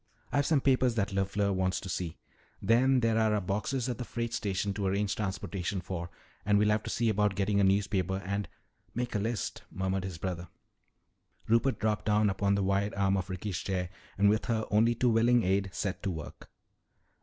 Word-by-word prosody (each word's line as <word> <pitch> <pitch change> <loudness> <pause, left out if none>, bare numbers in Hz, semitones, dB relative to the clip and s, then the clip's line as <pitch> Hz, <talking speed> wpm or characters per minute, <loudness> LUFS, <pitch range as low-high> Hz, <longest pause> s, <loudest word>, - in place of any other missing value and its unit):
"I've 145 0 +2
some 150 -4 +3
papers 130 -3 +3
that 105 -3 0
LeFleur 100 +1 0
wants 95 0 0
to - - -7
see. 90 -2 -3 0.4
Then 130 +3 +3
there're 115 -1 +2
our 110 -1 +3
boxes 105 +7 -2
at 125 -2 -3
the - - -2
freight 115 0 -4
station 100 -2 -1
to 100 -1 -2
arrange 100 +1 0
transportation 95 -1 -3
for, 85 -1 -5 0.3
and 105 0 +3
we'll 105 +1 +3
have 105 0 +2
to - - -6
see 115 - 0
about 105 -2 +2
getting 100 +1 +1
a - - +4
newspaper 95 -1 +1
and 100 -1 -2 0.2
" - - -39
"Make 120 0 -2
a 105 - 0
list," 115 +1 -2
murmured 95 0 -2
his 95 -4 -5
brother. 90 -1 -4 1.0
Rupert 115 +4 +3
dropped 105 -1 -1
down 105 -1 +3
upon 100 +1 +1
the 100 - 0
wide 100 +1 0
arm 100 -1 +2
of 95 0 -2
Ricky's 95 0 -3
chair 90 -2 -2 0.3
and 100 +1 +4
with 105 +1 +2
her 110 -2 0
only 115 +3 +4
too 120 +1 +2
willing 115 +1 +4
aid 95 +1 +1
set 100 0 -3
to 100 - -2
work. 80 -4 -7
100 Hz, 200 wpm, -30 LUFS, 95-110 Hz, 1.0 s, a